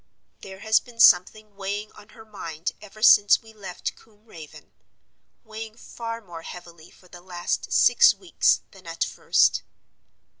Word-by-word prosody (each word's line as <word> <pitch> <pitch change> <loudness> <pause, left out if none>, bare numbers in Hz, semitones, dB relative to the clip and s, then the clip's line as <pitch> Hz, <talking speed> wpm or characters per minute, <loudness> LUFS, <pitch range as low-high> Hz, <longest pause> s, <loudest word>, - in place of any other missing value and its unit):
"There 190 0 -11
has 220 0 +3
been 240 -2 -18
something 210 +2 +4
weighing 200 +2 -5
on 210 - -18
her 225 - -14
mind 165 -6 -6
ever 215 +1 -12
since 205 -2 +6
we 225 0 -17
left 195 -4 -7
Combe 215 -1 -25
Raven—weighing 220 +5 -14
far 230 -1 -8
more 175 -5 -11
heavily 170 -1 -12
for 185 - -22
the 175 0 -14
last 175 -1 -4
six 485 - +5
weeks 365 -3 0
than 190 -3 -17
at 165 0 -2
first. - - +1
205 Hz, 145 wpm, -24 LUFS, 180-220 Hz, -, since